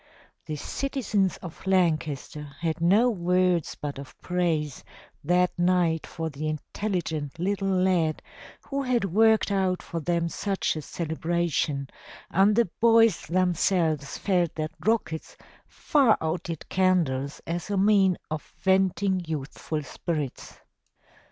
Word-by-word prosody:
The 155 Hz, -, -3 dB
citizens 210 Hz, -, -1 dB
of 175 Hz, +2 st, -9 dB
Lancaster 155 Hz, -5 st, 0 dB
had 165 Hz, 0 st, -1 dB
no 200 Hz, +8 st, +5 dB
words 180 Hz, -3 st, +1 dB
but 145 Hz, -2 st, -5 dB
of 140 Hz, -, -11 dB
praise 165 Hz, -6 st, -1 dB, 0.4 s
that 180 Hz, +3 st, +3 dB
night 175 Hz, -2 st, +2 dB
for 165 Hz, -1 st, -4 dB
the 155 Hz, 0 st, -4 dB
intelligent 155 Hz, -2 st, -3 dB
little 195 Hz, +3 st, -1 dB
lad 180 Hz, -4 st, +1 dB, 0.4 s
who 280 Hz, 0 st, -2 dB
had 250 Hz, -5 st, +1 dB
worked 220 Hz, +3 st, +3 dB
out 190 Hz, -2 st, 0 dB
for 170 Hz, -, -4 dB
them 170 Hz, +2 st, 0 dB
such 195 Hz, +2 st, -1 dB
a 155 Hz, -, -4 dB
celebration 160 Hz, -3 st, -1 dB, 0.4 s
and 200 Hz, +3 st, +4 dB
the 235 Hz, -1 st, +3 dB
boys 230 Hz, -4 st, +4 dB
themselves 170 Hz, -4 st, +1 dB
felt 180 Hz, -4 st, 0 dB
that 155 Hz, -1 st, -3 dB
rockets 215 Hz, -8 st, -1 dB, 0.3 s
far 270 Hz, -7 st, +3 dB
outdid 160 Hz, 0 st, -3 dB
candles 160 Hz, -8 st, +1 dB
as 170 Hz, +3 st, -4 dB
a 200 Hz, -, 0 dB
means 195 Hz, -2 st, +4 dB
of 155 Hz, -1 st, -2 dB, 0.2 s
venting 190 Hz, 0 st, +2 dB
youthful 150 Hz, 0 st, -4 dB
spirits. 150 Hz, -1 st, -5 dB
175 Hz, 120 wpm, -26 LUFS, 155-195 Hz, 0.4 s, no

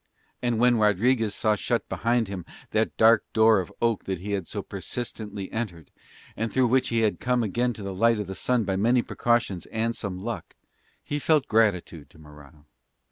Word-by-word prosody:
And 120 Hz, -2 st, 0 dB
when 120 Hz, 0 st, +4 dB
Rodriguez 110 Hz, +2 st, +2 dB
saw 110 Hz, -1 st, +2 dB
shut 120 Hz, +3 st, -1 dB
behind 120 Hz, -1 st, 0 dB
him 95 Hz, -2 st, -6 dB, 0.3 s
that 110 Hz, +1 st, 0 dB
dark 115 Hz, -1 st, +6 dB
door 110 Hz, -1 st, +5 dB
of 90 Hz, -, -5 dB
oak 115 Hz, -3 st, +1 dB
that 95 Hz, -1 st, -2 dB
he 100 Hz, +4 st, -6 dB
had 95 Hz, -4 st, -2 dB
so -, -, -5 dB
persistently 105 Hz, -5 st, -6 dB
entered, 90 Hz, -, -5 dB, 0.4 s
and 110 Hz, +1 st, -2 dB
through 130 Hz, -2 st, +2 dB
which 130 Hz, +1 st, +2 dB
he 115 Hz, -1 st, +1 dB
had 110 Hz, -2 st, +1 dB
come 125 Hz, -1 st, +1 dB
again 120 Hz, +4 st, 0 dB
to 105 Hz, -, -9 dB
the 100 Hz, -1 st, -4 dB
light 115 Hz, +3 st, +3 dB
of 105 Hz, -, -2 dB
the 95 Hz, -, -6 dB
sun 125 Hz, +4 st, 0 dB
by 95 Hz, -2 st, -1 dB
many 120 Hz, +4 st, +3 dB
precautions 120 Hz, -7 st, 0 dB
and 115 Hz, +1 st, -1 dB
some 100 Hz, -4 st, -4 dB
luck, 95 Hz, -, -6 dB, 0.5 s
he 145 Hz, -, -3 dB
felt 150 Hz, -1 st, +2 dB
gratitude 90 Hz, -9 st, +1 dB
to -, -, -20 dB
Morano. 75 Hz, -1 st, -16 dB
110 Hz, 190 wpm, -26 LUFS, 95-120 Hz, 0.5 s, dark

